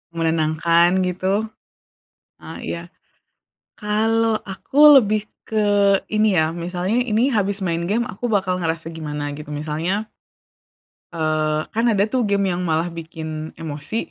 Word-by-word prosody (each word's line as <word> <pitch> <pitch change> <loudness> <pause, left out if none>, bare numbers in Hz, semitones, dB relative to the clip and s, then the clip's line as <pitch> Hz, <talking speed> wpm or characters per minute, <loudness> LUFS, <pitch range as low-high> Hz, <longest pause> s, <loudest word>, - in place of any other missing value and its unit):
Menenangkan 165 +2 +2
gitu. 190 +4 -1 0.9
Eee, - - -10
iya. 170 - -4 0.9
Kalau 225 +1 +1
aku 280 +9 +6
lebih 215 -1 -1 0.2
ke 205 -2 +2
ini 215 -3 +2
ya, 160 0 +2
misalnya 180 +6 -1
ini 235 +1 +1
habis 200 -2 0
main 170 -1 -1
game 235 +4 +1
aku 245 +1 -4
bakal 185 -3 0
ngerasa 165 -1 -2
gimana 150 -2 -4
gitu. 150 0 -10
Misalnya 160 +8 -2 1.1
eee, 155 -1 0
kan 230 +2 +1
ada 205 -4 +3
tuh 255 - +1
game 200 -1 +1
yang 175 +1 -2
malah 165 +2 0
bikin 160 -1 -7
emosi. 150 +5 -5
185 Hz, 130 wpm, -21 LUFS, 160-210 Hz, 1.1 s, aku